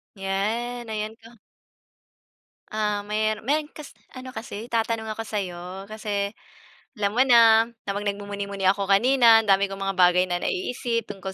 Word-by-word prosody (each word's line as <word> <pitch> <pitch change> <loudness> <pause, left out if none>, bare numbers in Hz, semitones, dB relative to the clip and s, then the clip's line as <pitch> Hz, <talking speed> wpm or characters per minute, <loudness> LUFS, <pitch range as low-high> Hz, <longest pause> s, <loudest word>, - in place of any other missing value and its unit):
'Yan, 220 +5 -3
ayan 215 +1 -3
ka. 230 +1 -16 1.3
Ah, 210 -1 -1
mer 215 +1 -1
meron 295 +4 0
kas 300 -2 -10 0.2
ano 255 0 -8
kasi 225 -2 -7
itatanong 225 -1 -1
ako 225 - -4
sa 210 -2 -2
'yo. 180 +1 -8
Kasi 205 -2 -3 0.7
alam 200 -1 0
mo 255 - +6
na, 230 -3 +6 0.2
habang 205 +1 -3
nagmumuni-muni 200 -1 -4
ako 200 0 +1
kanina 230 +2 +6
ang 215 - -10
dami 195 +1 +5
kong 195 0 -8
mga 195 0 -2
bagay 180 0 +5
na 175 - 0
naiisip 230 +3 -2
tungkol 190 -1 -6
210 Hz, 155 wpm, -24 LUFS, 195-230 Hz, 1.3 s, mo